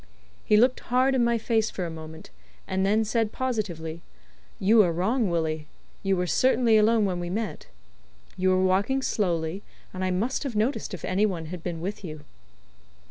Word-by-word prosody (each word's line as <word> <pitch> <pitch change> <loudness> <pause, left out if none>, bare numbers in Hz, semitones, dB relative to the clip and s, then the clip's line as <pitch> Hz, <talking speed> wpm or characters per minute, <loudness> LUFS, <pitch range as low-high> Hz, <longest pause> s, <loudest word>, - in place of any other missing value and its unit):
He 210 - +4
looked 250 +3 +4
hard 255 +2 +2
in 255 -2 +2
my 235 0 +2
face 220 -1 +1
for 185 - -4
a 165 - -5
moment, 160 - -10 0.4
and 190 0 0
then 215 +3 +2
said 220 0 0
positively: 175 -11 -3 0.6
"You 215 +3 +5
are 180 -4 +2
wrong, 200 +6 0
Willie. 160 -2 -1 0.3
You 195 -2 +1
were 180 - 0
certainly 235 - +3
alone 215 0 +4
when 180 -2 -1
we 175 0 -4
met. 215 +3 -4 0.7
You 185 0 +1
were 185 0 +3
walking 200 +9 +1
slowly, 175 -5 -1 0.3
and 185 0 -4
I 185 - +1
must 210 +9 -1
have 270 -6 -4
noticed 215 -1 -1
if 170 - -7
any 200 +3 +2
one 170 -5 -4
had 180 - -6
been 165 -1 -5
with 205 +4 -5
you." 155 -4 -7
195 Hz, 185 wpm, -26 LUFS, 175-225 Hz, 0.7 s, You